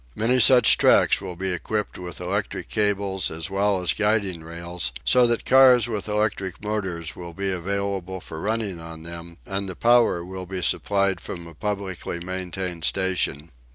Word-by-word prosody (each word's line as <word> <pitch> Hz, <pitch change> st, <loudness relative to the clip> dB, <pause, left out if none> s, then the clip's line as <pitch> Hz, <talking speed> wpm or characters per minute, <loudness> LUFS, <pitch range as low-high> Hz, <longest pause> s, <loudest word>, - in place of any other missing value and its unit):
Many 125 Hz, +4 st, +2 dB
such 125 Hz, 0 st, +7 dB
tracks -, -, +4 dB
will 95 Hz, -3 st, -6 dB
be 95 Hz, +1 st, -2 dB
equipped 105 Hz, +4 st, -3 dB
with 90 Hz, -2 st, -6 dB
electric 100 Hz, +3 st, -3 dB
cables 100 Hz, -3 st, 0 dB
as 80 Hz, +4 st, -5 dB
well 100 Hz, -1 st, +1 dB
as 90 Hz, -, +1 dB
guiding 105 Hz, -5 st, 0 dB
rails, 85 Hz, -3 st, -4 dB
so 125 Hz, -1 st, +5 dB
that 120 Hz, -1 st, -1 dB
cars 130 Hz, -2 st, +6 dB
with 110 Hz, -4 st, -4 dB
electric 105 Hz, -3 st, -1 dB
motors 95 Hz, -6 st, -3 dB
will 85 Hz, -1 st, -8 dB
be 100 Hz, 0 st, -2 dB
available 95 Hz, 0 st, -3 dB
for 80 Hz, -2 st, -8 dB
running 105 Hz, -4 st, -2 dB
on 80 Hz, -1 st, -9 dB
them, 85 Hz, 0 st, -8 dB
and 95 Hz, 0 st, -3 dB
the 90 Hz, -, -6 dB
power 115 Hz, -7 st, +3 dB
will 95 Hz, 0 st, -7 dB
be 90 Hz, -1 st, -4 dB
supplied 100 Hz, -1 st, +1 dB
from 85 Hz, -2 st, -7 dB
a 85 Hz, -, -11 dB
publicly 95 Hz, -1 st, -4 dB
maintained 90 Hz, -1 st, -5 dB
station. 90 Hz, -5 st, 0 dB
95 Hz, 165 wpm, -24 LUFS, 85-105 Hz, -, such